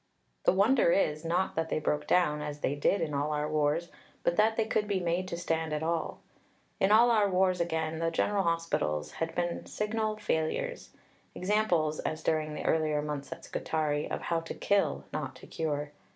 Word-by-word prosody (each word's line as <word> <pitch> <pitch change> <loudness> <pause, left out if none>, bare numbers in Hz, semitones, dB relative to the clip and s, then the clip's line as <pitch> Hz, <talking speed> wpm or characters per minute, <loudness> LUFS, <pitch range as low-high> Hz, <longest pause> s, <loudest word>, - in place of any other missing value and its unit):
The - - +6
wonder 200 +1 +4
is, 155 -4 +1
not 175 +3 0
that 160 0 -1
they - - 0
broke 150 -1 -1
down, 150 -5 +3
as 150 0 -5
they 135 - +1
did 145 +7 +1
in 155 -2 -2
all 145 +2 0
our 150 0 -1
wars, 155 +2 0 0.3
but 170 - +2
that 220 +2 +3
they 225 - +2
could 215 -1 0
be 200 -2 0
made 175 +1 -1
to 170 - -4
stand 160 -2 -1
at 150 +1 -2
all. 165 0 -2 0.6
In 195 - +3
all 235 +3 +7
our 210 -3 +4
wars, 185 -1 +2
again, 160 -1 -1
the 165 0 +1
general 200 +4 +1
hospitals 165 - -1
had 165 0 -4
been 175 -1 -2
signal 215 0 -1
failures 215 - -2 0.5
examples, 180 -6 +1
as 155 0 -3
during 155 -1 0
the - - -5
earlier 155 -2 +1
months 145 -2 -5
at - - -7
Scutari, 150 -2 -1
of - - -3
how 170 -1 0
to 165 - -7
kill, 200 -1 +1
not - - -3
to - - -13
cure. 150 -2 -3
165 Hz, 195 wpm, -30 LUFS, 150-190 Hz, 0.6 s, all